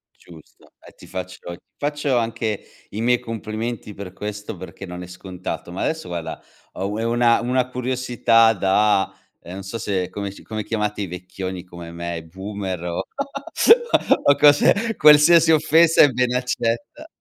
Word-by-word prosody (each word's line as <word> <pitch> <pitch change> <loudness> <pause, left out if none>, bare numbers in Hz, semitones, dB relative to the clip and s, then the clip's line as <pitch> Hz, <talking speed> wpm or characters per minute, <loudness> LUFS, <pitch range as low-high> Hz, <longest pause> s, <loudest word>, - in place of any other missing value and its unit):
Giusto, 80 -3 -18
e - - -15
ti - - -15
faccio 95 0 -7 0.2
ti - - -20 0.2
faccio 145 -3 -1
anche 115 -2 -2 0.3
i 105 - -5
miei 120 +1 +3
complimenti 110 0 -5
per 95 -2 -9
questo 105 0 -6
perché 95 +2 -9
non 90 0 -7
è 90 - -9
scontato, 90 -1 -7
ma 90 - -5
adesso, 160 0 -2
guarda, 85 -2 -5 0.3
ho 95 - -3
u 105 - -4
una 120 -1 +3
una 125 +1 0
curiosità 125 -3 +2
da, 100 0 +2 0.3
ehm, 90 - -10
non 95 +1 -7
so 100 +4 -5 0.3
come 100 +1 -5
s - - -14
come 110 -1 -5
chiamate 105 -1 -2
i 100 - -3
vecchioni 90 +1 -6
come 85 -2 -10
me, 85 -1 -5
boomer 95 +1 -6
o 85 -1 -3
o - - -3 1.2
o 145 - +5
cose, 150 +10 +4
qualsiasi 155 +2 +7
offesa 160 +1 +5
è 145 - +7
ben 125 0 0
accetta. 125 - -2
105 Hz, 160 wpm, -22 LUFS, 95-125 Hz, 1.2 s, qualsiasi